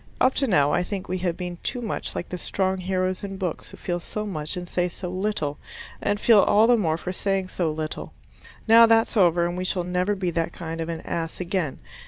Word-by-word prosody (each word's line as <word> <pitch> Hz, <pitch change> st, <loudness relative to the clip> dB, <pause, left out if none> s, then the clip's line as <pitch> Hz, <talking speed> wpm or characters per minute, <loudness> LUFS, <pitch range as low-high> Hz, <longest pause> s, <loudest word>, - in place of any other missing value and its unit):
Up 255 Hz, -, +4 dB
to 275 Hz, -, 0 dB
now 150 Hz, -, +3 dB
I -, -, +3 dB
think 190 Hz, +1 st, -4 dB
we 185 Hz, +1 st, -2 dB
have 175 Hz, -2 st, -1 dB
been 180 Hz, -1 st, -5 dB
too 245 Hz, -, -2 dB
much 230 Hz, -3 st, -3 dB
like -, -, -4 dB
the 180 Hz, -, -4 dB
strong 190 Hz, +1 st, 0 dB
heroes 185 Hz, 0 st, -1 dB
in 195 Hz, -1 st, -5 dB
books 180 Hz, -4 st, -4 dB
who -, -, -12 dB
feel 175 Hz, -1 st, -2 dB
so 210 Hz, +4 st, -5 dB
much 155 Hz, -5 st, -4 dB
and 180 Hz, 0 st, -5 dB
say 180 Hz, 0 st, 0 dB
so 180 Hz, +1 st, -6 dB
little, 185 Hz, -7 st, -2 dB, 0.4 s
and 205 Hz, 0 st, 0 dB
feel 225 Hz, -2 st, +6 dB
all 210 Hz, +2 st, +5 dB
the 240 Hz, +1 st, +5 dB
more 165 Hz, -8 st, +1 dB
for 180 Hz, +2 st, -5 dB
saying 195 Hz, -1 st, -1 dB
so 170 Hz, -4 st, -1 dB
little. 155 Hz, 0 st, -5 dB, 0.6 s
Now 230 Hz, +1 st, +8 dB
that's 225 Hz, +1 st, +3 dB
over 175 Hz, -4 st, +4 dB
and 175 Hz, 0 st, -2 dB
we 180 Hz, -, -2 dB
shall 185 Hz, -1 st, 0 dB
never 180 Hz, +3 st, 0 dB
be 185 Hz, -2 st, -1 dB
that 165 Hz, 0 st, -1 dB
kind 165 Hz, 0 st, -5 dB
of 165 Hz, -, -4 dB
an 165 Hz, -1 st, -4 dB
ass 165 Hz, -1 st, -4 dB
again. 180 Hz, -5 st, -2 dB
180 Hz, 235 wpm, -25 LUFS, 170-200 Hz, 0.6 s, Now